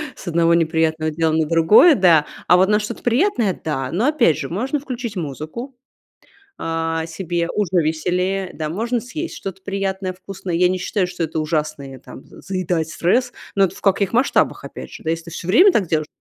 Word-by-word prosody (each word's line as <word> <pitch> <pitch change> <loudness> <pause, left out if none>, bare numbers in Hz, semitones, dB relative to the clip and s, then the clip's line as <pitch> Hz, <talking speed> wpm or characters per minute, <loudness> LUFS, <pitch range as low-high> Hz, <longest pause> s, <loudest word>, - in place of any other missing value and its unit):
с - - -12
одного 170 0 +3
неприятного 160 -1 +1
дела 160 +1 0
на 160 0 +1
другое, 165 - +6
да. 170 - +5 0.2
А 180 - +6
вот 190 +2 +3
на 210 0 +3
что-то 210 - -6
приятное, 245 - +1
да, 135 -4 -2
но 210 +10 +1
опять 270 - +3
же, 140 - -4
можно 255 - -2
включить 250 -5 -6
музыку, 165 - -6 0.8
а, 165 0 -2
себе, 170 0 -3
уже 190 -4 +1
веселее, 180 +4 -1
да, 155 - -4
можно 230 +8 -1
съесть 310 +8 -6
что-то 190 -1 -7
приятное, 195 -1 -2
вкусное. 185 0 -7
Я 180 +1 +4
не 185 +1 0
считаю, 185 0 -1
что 180 -1 -4
это 160 0 -2
ужасное, 155 -3 -3
там, 130 - -12
заедать 180 -4 -3
стресс. 240 +11 +1 0.2
Но 195 - +4
это 190 - 0
в - - -13
каких 195 -1 +1
масштабах, 245 +4 +1
опять - - -9
же, - - -11
да. 160 - -3
Если 165 0 -2
ты 170 - -10
все 170 - -7
время 360 - +6
так 205 - +1
делаешь,, 155 -1 0
180 Hz, 190 wpm, -20 LUFS, 160-205 Hz, 0.8 s, другое